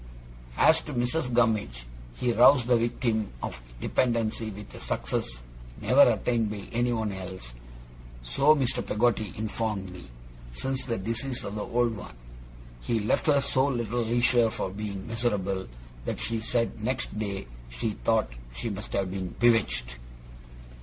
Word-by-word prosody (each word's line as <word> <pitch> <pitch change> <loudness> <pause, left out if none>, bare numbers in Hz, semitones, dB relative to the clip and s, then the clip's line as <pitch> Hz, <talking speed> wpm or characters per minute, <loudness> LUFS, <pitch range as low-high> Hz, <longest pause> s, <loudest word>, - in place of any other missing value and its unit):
As 160 0 +6
to 150 - -7
Mrs. 125 +3 0
Gummidge, 110 - +1 0.3
he 120 - 0
roused 125 +2 +6
that 120 -1 +4
victim 115 -2 0
of 60 - -5 0.2
despondency 115 - 0
with 105 0 -10
a - - -9
success - - -3 0.4
never - - +5
attained 115 -3 0
by 105 -1 -5
anyone 115 -3 0
else 95 -10 -7 0.7
(so 135 - +4
Mr. 135 -5 0
Peggotty 110 -1 +1
informed 105 -3 -2
me), 90 -1 -10 0.5
since 135 - -2
the 115 -3 -1
decease 115 +6 -3
of 100 - -5
the 105 - -3
old 120 +1 +1
one. 80 - -9 0.7
He 115 - 0
left 105 - +1
her 140 -2 +5
so 135 0 +2
little 120 -3 -1
leisure 120 0 +3
for 95 - -3
being 100 -1 -5
miserable, 105 -5 -1 0.4
that - - -3
she 115 -1 -2
said 115 0 -1
next 120 -3 -2
day 100 -5 -3 0.2
she - - -2
thought 110 - +1 0.2
she 110 - -3
must 100 +1 -7
have 95 -2 0
been 95 -2 -4
bewitched. 105 - +2
115 Hz, 145 wpm, -28 LUFS, 100-120 Hz, 0.7 s, As